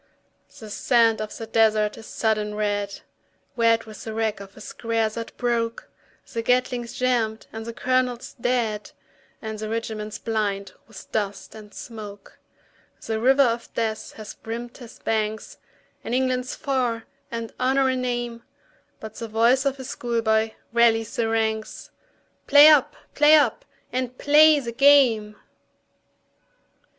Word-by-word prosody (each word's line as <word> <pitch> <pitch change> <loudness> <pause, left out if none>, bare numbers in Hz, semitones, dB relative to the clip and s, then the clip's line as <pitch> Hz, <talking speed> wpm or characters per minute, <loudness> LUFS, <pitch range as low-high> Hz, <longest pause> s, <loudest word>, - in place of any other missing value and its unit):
The 215 -2 -10
sand 230 0 +3
of 215 - -6
the 225 - -6
desert 220 -1 +2
is 220 - -12
sodden 215 -2 -1
red, 205 -1 -2 0.5
Red 230 -1 +3
with 215 -1 -11
the 220 -1 -6
wreck 220 -2 -1
of 200 +1 -12
a - - -10
square 225 +1 -2
that 230 +1 -8
broke; 235 -2 -2 0.4
The 230 - -1
Gatling's 245 0 0
jammed 235 -4 0
and 225 +1 -7
the 230 - -5
colonel 255 0 +1 0.2
dead, 230 -4 -1 0.5
And 220 -1 -5
the 215 0 -4
regiment 220 -2 -4
blind 200 -4 -2
with 220 -4 -13
dust 205 -2 -3
and 215 -1 -12
smoke. 210 -4 -10 0.7
The 220 -1 -2
river 265 +4 +5
of 235 -2 -1
death 220 -1 -2
has 215 -1 -9
brimmed 235 +2 -7
his 240 -4 -12
banks, 220 -1 -3 0.4
And 235 - -2
England's 255 -1 0
far, 250 -6 -1 0.3
and 230 -1 -5
Honour 265 +1 +2
a 260 - +1
name, 240 -2 -3 0.6
But 220 -1 -8
the 230 - -6
voice 235 +5 +3
of 270 -1 -3
schoolboy 225 -3 0 0.2
rallies 225 -2 +3
the 225 -1 0
ranks, 220 -1 -2 0.6
"Play 290 +2 +9
up! 300 -4 +4 0.2
play 295 +1 +6
up! 300 - +2 0.3
and 255 0 -3
play 300 +1 +6
the 235 -4 -5
game!" 235 -5 +4
230 Hz, 140 wpm, -24 LUFS, 220-250 Hz, 0.7 s, Play